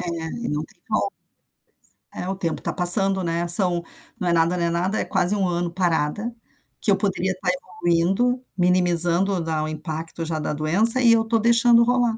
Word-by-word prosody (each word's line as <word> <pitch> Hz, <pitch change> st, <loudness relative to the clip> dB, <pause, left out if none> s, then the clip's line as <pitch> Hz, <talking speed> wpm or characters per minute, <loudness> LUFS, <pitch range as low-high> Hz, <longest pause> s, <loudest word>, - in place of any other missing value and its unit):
É, 180 Hz, -, -7 dB, 0.4 s
e -, -, -5 dB
não 150 Hz, +1 st, -4 dB
tem -, -, -24 dB
volta. -, -, -3 dB, 1.0 s
É 180 Hz, -, -7 dB
o 195 Hz, -, -4 dB
tempo 170 Hz, -4 st, -5 dB
está -, -, -5 dB
passando, 190 Hz, +1 st, +5 dB
né, 170 Hz, +1 st, -3 dB
são 175 Hz, -1 st, +2 dB, 0.4 s
não 185 Hz, -, -4 dB
é 170 Hz, -, 0 dB
nada, 165 Hz, +2 st, 0 dB
não 170 Hz, -, -3 dB
é -, -, -1 dB
nada, 180 Hz, +5 st, -3 dB
é -, -, -3 dB
quase 190 Hz, 0 st, -2 dB
1 195 Hz, -2 st, -1 dB
ano 175 Hz, -1 st, -3 dB
parada, 180 Hz, +5 st, -3 dB, 0.5 s
que 210 Hz, -, 0 dB
eu 195 Hz, -, +2 dB
poderia 190 Hz, -1 st, -3 dB
estar 185 Hz, 0 st, -5 dB
evoluindo, 180 Hz, +8 st, -2 dB
minimizando 180 Hz, +1 st, +3 dB
dar 160 Hz, -1 st, -4 dB
o 155 Hz, -, -4 dB
impacto 160 Hz, +1 st, -7 dB
já 160 Hz, -1 st, -4 dB
da 150 Hz, -, -4 dB
doença 195 Hz, +12 st, +6 dB
e 235 Hz, -2 st, +4 dB
eu 225 Hz, -, +2 dB
estou 225 Hz, 0 st, -1 dB
deixando 235 Hz, +1 st, +3 dB
rolar. 240 Hz, -2 st, -1 dB
180 Hz, 195 wpm, -21 LUFS, 170-205 Hz, 1.0 s, doença